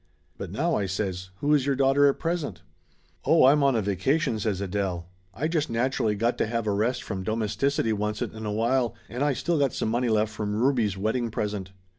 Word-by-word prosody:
"But - - -6
now," 160 - 0
I 100 -8 0
says, 95 -1 -3
"who 150 +1 +3
is 140 -2 +2
your 140 - +2
daughter 135 +1 +4
at 140 - +2
present 155 - -3 0.3
?" - - -38
"Oh, - - +5
I'm 145 +3 +5
on 140 -2 +3
a 110 - +1
vacation," 110 - 0
says 105 -3 -1
Adele. 95 -3 -2 0.3
"I 140 +10 -2
just 160 -5 -1
natu 125 +4 0
rally 105 -1 +1
got 115 +4 0
to - - +1
have 115 0 -2
a 105 - +1
rest 115 +5 0
from 95 -3 -4
domesticity 115 +4 0
oncet 105 0 -2
in 110 -1 -6
a - - -1
while, 115 +2 +1
and 125 +4 -5
I 145 -1 +2
still 165 +4 0
got 140 -4 +2
some - - -1
money 120 +2 0
left 110 -1 +1
from 105 -1 -3
Ruby's 115 -4 +1
wedding 115 +4 -1
present." 105 -3 -3
115 Hz, 220 wpm, -26 LUFS, 105-135 Hz, 0.3 s, Oh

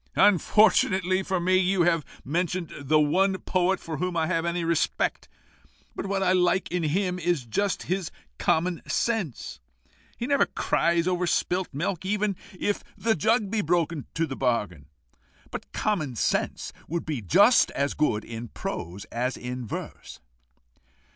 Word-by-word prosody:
"Unfortunately 190 -1 +4
for 190 -1 -1
me, 185 +2 +3
you 185 -1 +2
have 165 -2 +2 0.2
mentioned 175 +3 -2
the 150 +2 +2
one 190 +6 +2
poet 185 0 0
for 160 -2 -6
whom 180 +2 -2
I 160 - +2
have 165 0 0
any 170 0 -1
respect. 165 -1 0 0.7
But - - -4
what 195 0 0
I 185 - +3
like 180 0 +2
in 180 0 0
him 180 +3 0
is 170 -6 0
just 200 - -1
his 185 -2 -2 0.3
common 170 +1 +1
sense. 215 - -2 0.6
He 235 - -3
never 280 +1 +3
cries 170 0 +1
over 180 -1 0
spilt 180 +2 0
milk, 165 +5 -2
even 205 +1 0 0.2
if 205 - -1
the 225 0 +2
jug 215 +3 +1
be 220 -2 +1
broken 165 -3 0
to 165 - +1
the 135 - -6
bargain. 105 - -1 0.6
But - - -7
common 155 - -1
sense - - -1
would 170 +2 -3
be 150 -6 -3
just 200 - +5
as 140 0 -1
good 110 -8 0
in 115 +1 -6
prose 95 -2 -6
as 125 +2 -2
in 125 -1 -5
verse." - - -7
175 Hz, 155 wpm, -26 LUFS, 150-190 Hz, 0.7 s, just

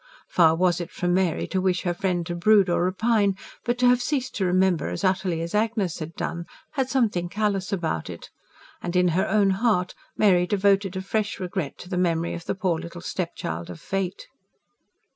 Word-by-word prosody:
Far 165 -2 +4
was 180 0 +2
it 175 - -5
from 175 -1 -1
Mary 185 -3 +1
to 190 - 0
wish 185 -1 +1
her 175 - 0
friend 175 -1 -1
to 175 - -4
brood 195 +1 +4
or 175 - +2
repine; 200 +1 +2 0.3
but 240 0 0
to 250 0 +4
have 250 0 +4
ceased 265 -1 -1
to 195 - +1
remember 185 -1 +2
as - - -4
utterly 185 -3 +1
as 165 0 -5
Agnes 210 -5 0
had 160 +1 -6
done 170 0 -4 0.2
had 265 -4 -1
something 210 -10 +1
callous 200 -2 -1
about 165 - -2
it; - - -9 0.5
and, 175 0 -4
in 180 0 +4
her 175 +3 +1
own 200 -1 +3
heart, 190 -3 +1 0.2
Mary 180 -4 +4
devoted 195 -1 +2
a 190 - -4
fresh 210 +1 -2
regret 180 -5 -4
to - - -11
the 180 -1 -3
memory 170 -2 0
of 170 0 -7
the - - -2
poor 185 -4 0
little 170 +1 -8
stepchild 90 - -4
of 85 -2 -8
fate. 195 - -3
185 Hz, 200 wpm, -25 LUFS, 175-205 Hz, 0.5 s, Far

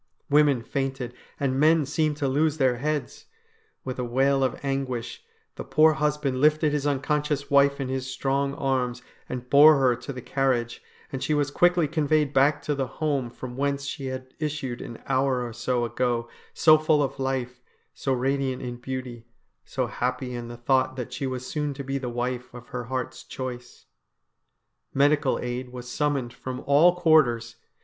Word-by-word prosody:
Women 145 -4 +4
fainted, 135 -2 -3 0.3
and 135 -1 0
men 155 0 +4
seemed 150 +1 0
to 145 -2 0
lose 150 +3 +1
their 130 -4 +2
heads. 150 +3 -3 0.6
With 130 -1 -4
a - - 0
wail 135 +3 +2
of 130 - -1
anguish, 130 -4 -3 0.3
the - - -4
poor 155 +1 +4
husband 150 -3 -1
lifted 150 0 +4
his 145 -1 0
uncon 145 +1 0
scious 145 -2 -3
wife 140 0 +4
in 135 - -2
his 130 0 -3
strong 140 +2 -1
arms, 125 -3 -1 0.3
and 125 -1 -5
bore 145 +3 +8
her 130 -3 +3
to 125 +4 -7
the 130 - -7
carriage, 125 -4 0 0.3
and 135 - -4
she 150 +3 +1
was 145 -1 0
quickly 175 0 +3
conveyed 150 -1 +1
back 145 +2 +3
to 150 - 0
the 135 -2 -2
home 140 -6 0
from 125 +1 -8
whence 140 +1 -1
she 140 -1 -5
had 130 0 -6
issued 150 -5 -3
an 115 - -9
hour 130 -2 +1
or 120 - -7
so 120 +1 -1
ago 120 0 -1 0.2
so 155 -1 +5
full 155 -1 +3
of 135 0 -4
life, 130 -2 -2 0.3
so 135 - -3
radiant 130 0 0
in 120 -1 -5
beauty, 125 -2 -6 0.4
so - - -2
happy 125 0 -3
in 120 -1 -5
the 120 0 -8
thought 130 +1 +1
that 125 -3 -6
she 135 - -3
was 130 -1 -4
soon 150 -1 -3
to 140 - -6
be 135 +1 -2
the 125 -2 -4
wife 125 +1 -3
of 120 0 -11
her 125 -1 -5
heart's 130 0 -4
choice. 125 -2 -7 1.1
Medical 145 0 +3
aid 125 +1 -4
was 125 0 -8
summoned 135 -2 -1
from 130 0 -6
all 155 +6 +5
quarters. 125 -9 +3
135 Hz, 180 wpm, -26 LUFS, 125-145 Hz, 1.1 s, bore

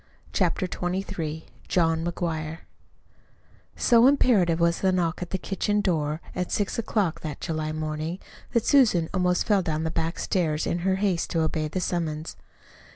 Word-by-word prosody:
CHAPTER 185 -2 +1
XXIII 180 -3 -3 0.2
JOHN 165 -2 +2
McGUIRE 165 -2 -3 1.1
So 235 +1 +5
imperative 205 - +3
was 170 0 +2
the 190 - +3
knock 175 -2 0
at 175 - -4
the 190 - -1
kitchen 205 +2 -1
door 155 -5 0
at 180 -1 -2
six 205 +2 -1
o'clock 205 -6 0
that 150 -3 -6
July 155 -1 -2
morning 155 +2 -3 0.4
that 235 -3 +2
Susan 215 - +4
almost 180 -1 +1
fell 205 -3 +3
down 160 -2 -2
the 160 - -1
back 165 +1 -2
stairs 160 -4 0
in 175 - -1
her 190 +2 +1
haste 190 -3 0
to 165 - 0
obey 155 -1 0
the 170 +5 -3
summons. 160 -3 -2
170 Hz, 155 wpm, -26 LUFS, 160-190 Hz, 1.1 s, So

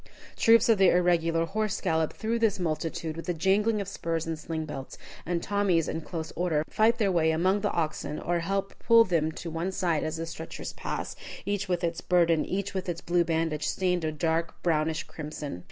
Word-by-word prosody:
Troops 230 +2 +5
of 225 -4 +4
the 190 -2 +7
irregular 165 -2 +2
horse 215 +3 -1
gallop 160 -4 +1
through 230 +1 -1
this 220 -3 +2
multitude, 160 -2 -2
with 165 +2 -6
a 175 - 0
jangling 205 +6 +2
of 200 - -3
spurs 165 -4 -2
and 165 -1 -3
sling 160 0 -4
belts; 135 -3 -7 0.3
and 170 -1 -1
Tommies, 195 -5 +1
in 165 - -3
close 160 0 -6
order, 165 -4 +1
fight 225 +2 +3
their 205 -4 +2
way 165 -3 +3
among 185 +5 +2
the 205 - +1
oxen, 155 -2 -2
or 175 0 0
help 195 +3 -2
pull 230 -1 +6
them 165 -5 +1
to 165 +1 -6
one 165 +4 -2
side 170 -5 0
as 160 0 -3
the 165 - -3
stretchers 165 0 -7
pass, - - -4 0.3
each 205 -1 -2
with 175 -1 0
its 170 -1 -1
burden, 170 -3 +3
each 200 +1 -3
with 190 -1 -3
its 170 -1 -2
blue 175 0 +2
bandage 160 -2 -1
stained 180 -2 0
a 155 - 0
dark 160 +2 -1
brownish 160 -1 +1
crimson. 150 - -6
170 Hz, 200 wpm, -28 LUFS, 160-195 Hz, 0.3 s, the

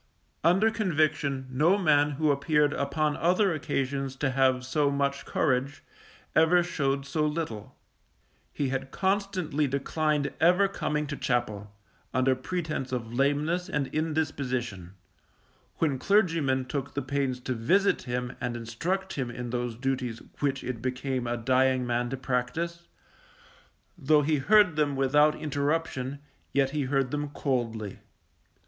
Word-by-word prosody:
Under 190 +7 +4
conviction, 155 -9 0
no 155 +9 +3
man 150 -5 +3
who 155 -1 +3
appeared 150 +1 +2
upon 145 +2 0
other 180 +3 +2
occasions 135 -2 -2
to 135 0 -1
have 130 -1 +2
so 145 +2 +1
much 140 0 -1
courage, 135 0 0 0.5
ever 175 +2 +5
showed 140 -5 -1
so 155 +2 -1
little. 150 -9 -4 0.8
He 140 -2 -2
had 135 0 -3
constantly 190 -5 0
declined 145 +2 0
ever 180 +4 +5
coming 150 -6 -2
to 150 +1 -4
chapel, 105 -6 -2 0.4
under 130 +1 +3
pretence 155 -2 -3
of 120 -2 -4
lameness 150 +7 +1
and 145 -6 -2
indisposition; 130 - -2 0.8
when 145 -5 0
clergymen 165 -10 +2
took 140 +1 -4
the 140 - -1
pains 135 -1 -1
to 130 - -2
visit 185 - +2
him 125 0 -3
and 120 -1 -2
instruct 170 +12 -3
him 130 -4 -3
in 120 0 -6
those 120 -1 -2
duties 125 -2 -2 0.2
which 140 -2 -1
it 120 -3 -4
became 130 0 -2
a 120 0 -1
dying 130 +1 +2
man 120 0 0
to 135 - -3
practice, 160 +7 -2 1.1
though 150 0 +4
he 150 +1 +2
heard 185 +3 +4
them 145 -2 +1
without 145 +3 +4
interruption, 145 -2 -2 0.4
yet 135 -1 +2
he 145 -2 -1
heard 135 -1 0
them 150 0 -2
coldly. 115 -8 -2
140 Hz, 135 wpm, -28 LUFS, 130-155 Hz, 1.1 s, ever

